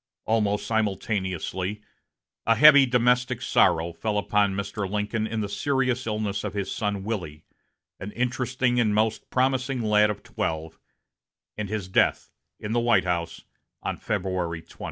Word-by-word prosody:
Almost 105 -2 +1
simultaneously, 100 -2 -2 0.7
a 115 - +5
heavy 145 +2 +8
domestic 125 0 +2
sorrow 85 +1 +2
fell 105 +5 -2
upon 105 -1 +1
Mr. 100 0 -3
Lincoln 105 +2 -1
in 110 -1 -3
the 105 - -2
serious 130 +1 -1
illness 105 -2 -2
of - - -4
his 100 -1 -3
son 100 -2 -2
Willie, 85 -8 -5 0.5
an 100 - -6
interesting 125 0 0
and 105 -3 +2
most 110 +1 0
promising 130 -1 0
lad 105 -1 +4
of 105 - -5
twelve, 80 0 -4 0.8
and 105 -2 -4
his 105 -3 -3
death 95 - +1 0.3
in 105 - -5
the 120 - +2
White 120 0 +3
House 85 -2 -2 0.4
on - - -2
February 90 -5 -3
20. - - -19
105 Hz, 145 wpm, -25 LUFS, 95-120 Hz, 0.8 s, heavy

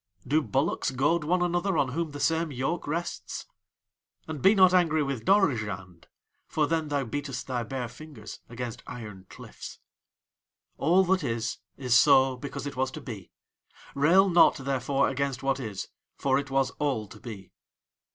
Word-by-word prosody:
Do 150 +4 +2
bullocks 135 +6 0
goad 145 +5 +1
one 175 +4 +1
another 175 +1 0
on 135 - +2
whom 165 +5 -2
the 145 0 -8
same 160 +2 +1
yoke 135 +7 -2
rests? 170 +4 -4 0.8
"And 155 -3 -5
be 195 +3 +6
not 185 -2 +6
angry 160 -4 +3
with 135 -5 -4
Dorozhand, 105 - +1 0.4
for 155 - +1
then 160 0 -1
thou 145 -2 0
beatest 140 +2 -4
thy 125 -2 -2
bare 125 +1 -4
fingers 125 -4 -11
against 120 -1 -6
iron 105 -6 -9
cliffs. - - -10 1.0
"All 175 +6 +4
that 185 -1 +1
is 115 -3 -2 0.2
is 125 -3 +1
so 135 -1 +6
because 140 +3 -6
it 145 - -5
was 130 0 0
to 155 - -7
be. 110 -8 -8 0.6
Rail 170 +8 +5
not, 175 -2 +6
therefore, 135 0 0
against 135 0 -2
what 135 0 +1
is, 110 -6 -5 0.3
for 135 0 +1
it 140 0 -6
was 135 -1 +1
all 135 -8 0
to 100 - -14
be." 105 -6 -9
140 Hz, 160 wpm, -27 LUFS, 125-160 Hz, 1.0 s, be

